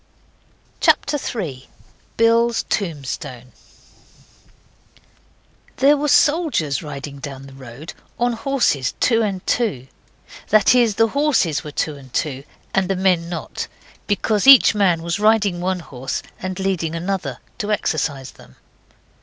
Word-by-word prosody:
CHAPTER 295 Hz, 0 st, +2 dB
3. 155 Hz, -, -5 dB, 0.5 s
BILL'S 230 Hz, +1 st, +3 dB
TOMBSTONE 140 Hz, -, -4 dB, 2.3 s
There 280 Hz, +3 st, +5 dB
were 295 Hz, +1 st, -1 dB
soldiers 290 Hz, -, +2 dB
riding 140 Hz, -2 st, -7 dB
down 135 Hz, -1 st, -8 dB
the 135 Hz, -, -13 dB
road, 135 Hz, +4 st, -10 dB, 0.2 s
on 240 Hz, 0 st, +1 dB
horses 225 Hz, -, 0 dB
two 230 Hz, -2 st, +3 dB
and 195 Hz, -4 st, -2 dB
two. 150 Hz, -, -1 dB, 0.6 s
That 215 Hz, +1 st, +5 dB
is 235 Hz, -4 st, +3 dB
the 225 Hz, +1 st, +3 dB
horses 275 Hz, -, +1 dB
were 150 Hz, -, -7 dB
two 150 Hz, 0 st, -3 dB
and 130 Hz, -2 st, -15 dB
two, 135 Hz, 0 st, -2 dB, 0.3 s
and 190 Hz, -1 st, +1 dB
the 195 Hz, -, +1 dB
men 180 Hz, -3 st, +1 dB
not. 170 Hz, -2 st, -5 dB, 0.4 s
Because 210 Hz, +3 st, 0 dB
each 270 Hz, -3 st, +9 dB
man 185 Hz, -6 st, +2 dB
was 170 Hz, +3 st, -2 dB
riding 210 Hz, -4 st, +2 dB
one 185 Hz, 0 st, -1 dB
horse 130 Hz, -4 st, -5 dB, 0.2 s
and 185 Hz, 0 st, -4 dB
leading 180 Hz, -4 st, -1 dB
another. 170 Hz, -7 st, -3 dB, 0.2 s
To 210 Hz, 0 st, -2 dB
exercise 145 Hz, -9 st, -1 dB
them. 65 Hz, -, -18 dB
185 Hz, 130 wpm, -20 LUFS, 145-225 Hz, 2.3 s, each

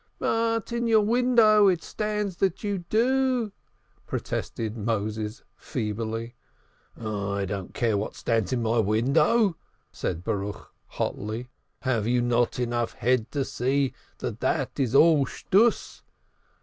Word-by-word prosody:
"But 230 Hz, 0 st, 0 dB
in 235 Hz, 0 st, -1 dB
your 220 Hz, -2 st, +5 dB
window 230 Hz, -3 st, +5 dB
it 180 Hz, -3 st, +2 dB
stands 210 Hz, -3 st, -3 dB
that 195 Hz, +2 st, 0 dB
you 205 Hz, -2 st, -1 dB
do," 250 Hz, 0 st, +2 dB, 0.6 s
protested 110 Hz, -1 st, -3 dB
Moses 110 Hz, 0 st, -3 dB
feebly. 115 Hz, 0 st, -4 dB, 0.7 s
"I 100 Hz, -2 st, -2 dB
don't 95 Hz, -1 st, -5 dB
care 115 Hz, -3 st, +1 dB
what 100 Hz, +1 st, -3 dB
stands 115 Hz, -5 st, 0 dB
in 125 Hz, -2 st, 0 dB
my 115 Hz, +1 st, +2 dB
window," 150 Hz, -, +3 dB, 0.3 s
said 85 Hz, -1 st, -3 dB
Baruch 105 Hz, -1 st, -4 dB
hotly. 110 Hz, +4 st, -4 dB, 0.3 s
"Have 115 Hz, -5 st, 0 dB
you 125 Hz, +1 st, +2 dB
not 120 Hz, 0 st, +1 dB
head 125 Hz, -, -1 dB
enough 120 Hz, -1 st, -2 dB, 0.3 s
to 140 Hz, -2 st, -1 dB
see 135 Hz, +2 st, 0 dB, 0.2 s
that -, -, -5 dB
that -, -, -1 dB
is 130 Hz, -2 st, +1 dB
all 150 Hz, -3 st, +6 dB, 0.2 s
bunkum? 220 Hz, +4 st, +3 dB
125 Hz, 125 wpm, -26 LUFS, -, 0.7 s, all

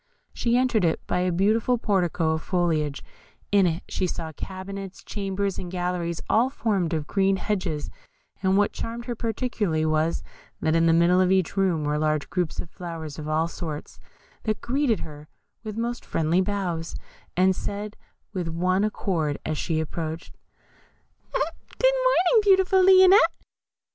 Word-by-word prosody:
She 235 Hz, 0 st, +1 dB
entered 250 Hz, -5 st, +2 dB
it 165 Hz, -2 st, +2 dB
by -, -, 0 dB
a 180 Hz, 0 st, +1 dB
beautiful 215 Hz, +7 st, +2 dB
portico 180 Hz, -7 st, +1 dB
of 160 Hz, 0 st, -1 dB
foliage; 160 Hz, -6 st, 0 dB, 0.5 s
in 200 Hz, -2 st, +5 dB
it 165 Hz, +2 st, -2 dB
she 185 Hz, -, -1 dB
saw 165 Hz, -2 st, -4 dB
cabinets, 190 Hz, +4 st, -7 dB
chambers, 200 Hz, -1 st, -2 dB
and 180 Hz, -, -5 dB
galleries, 175 Hz, -2 st, -2 dB
all 235 Hz, +4 st, +3 dB
formed 205 Hz, -, -1 dB
of 155 Hz, -2 st, -2 dB
green 195 Hz, +3 st, +2 dB
hedges, 185 Hz, -6 st, -2 dB, 0.5 s
and 190 Hz, 0 st, +3 dB
what 205 Hz, 0 st, +3 dB
charmed 235 Hz, +1 st, -5 dB
her 245 Hz, -, -2 dB
particularly 220 Hz, -8 st, -1 dB
was, 155 Hz, +1 st, +1 dB, 0.4 s
that 160 Hz, 0 st, +1 dB
in 165 Hz, 0 st, +4 dB
the -, -, +5 dB
middle 170 Hz, +2 st, +4 dB
of 185 Hz, 0 st, +3 dB
each 190 Hz, -1 st, +1 dB
room 185 Hz, -6 st, +1 dB
were 150 Hz, 0 st, 0 dB
large 155 Hz, -1 st, 0 dB
groups 180 Hz, -4 st, -2 dB
of 170 Hz, -, -5 dB
flowers 165 Hz, -4 st, -7 dB
of 155 Hz, 0 st, -5 dB
all 160 Hz, +2 st, +1 dB
sorts, 160 Hz, -3 st, -7 dB, 0.4 s
that 215 Hz, -1 st, -1 dB
greeted 260 Hz, -3 st, 0 dB
her 150 Hz, -1 st, -9 dB, 0.4 s
with 215 Hz, -1 st, -6 dB
most 235 Hz, +1 st, -2 dB
friendly 165 Hz, +3 st, +1 dB
bows, 185 Hz, -4 st, -2 dB, 0.4 s
and 185 Hz, +1 st, +4 dB
said 205 Hz, +2 st, -5 dB, 0.4 s
with 180 Hz, -4 st, -2 dB
one 180 Hz, +4 st, +1 dB
accord, 170 Hz, -8 st, -1 dB
as 155 Hz, -, -1 dB
she 160 Hz, +1 st, -1 dB
approached, 160 Hz, +1 st, -5 dB, 1.0 s
"Good -, -, +1 dB, 0.5 s
morning, -, -, +4 dB
beautiful 380 Hz, -2 st, +4 dB
Lionette." 375 Hz, +3 st, +7 dB
185 Hz, 155 wpm, -25 LUFS, 165-215 Hz, 1.0 s, Lionette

